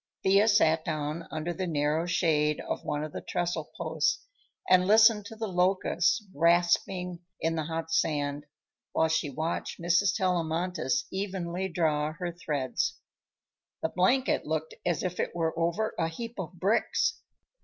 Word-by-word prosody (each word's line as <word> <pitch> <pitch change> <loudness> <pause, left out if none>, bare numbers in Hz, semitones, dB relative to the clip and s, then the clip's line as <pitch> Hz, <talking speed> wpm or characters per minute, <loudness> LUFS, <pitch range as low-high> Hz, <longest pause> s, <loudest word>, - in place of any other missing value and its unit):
Thea 195 +3 +5
sat 160 -7 +4
down 155 +2 -3
under 160 +2 -3
the 185 +1 -3
narrow 155 +1 0
shade 155 -3 +2
of - - -4
one 145 0 -2
of 155 - -5
the - - -5
trestle 175 +1 -2
posts 485 0 0 0.4
and 185 0 +5
listened 215 -1 +6
to 225 - -9
the 220 0 -3
locusts 185 +2 +1
rasping 175 +2 +2 0.2
in 165 0 0
the 160 -2 -2
hot 165 0 -4
sand 145 -2 0 0.5
while 160 - +2
she 155 -2 0
watched 160 +5 -3
Mrs. 180 +2 +2
Tellamantez 175 -5 0
evenly 190 -1 -3
draw 155 -3 0
her 175 +1 -4
threads. 145 -7 -2 0.9
The 160 - +1
blanket 245 +11 +2
looked 160 +1 -3
as 170 -5 0
if 180 -1 -3
it - - -2
were 165 -1 0
over 170 +6 0
a 165 - +2
heap 230 +7 -7
of 185 -1 -5
bricks. 190 +5 +1
170 Hz, 150 wpm, -29 LUFS, 160-185 Hz, 0.9 s, listened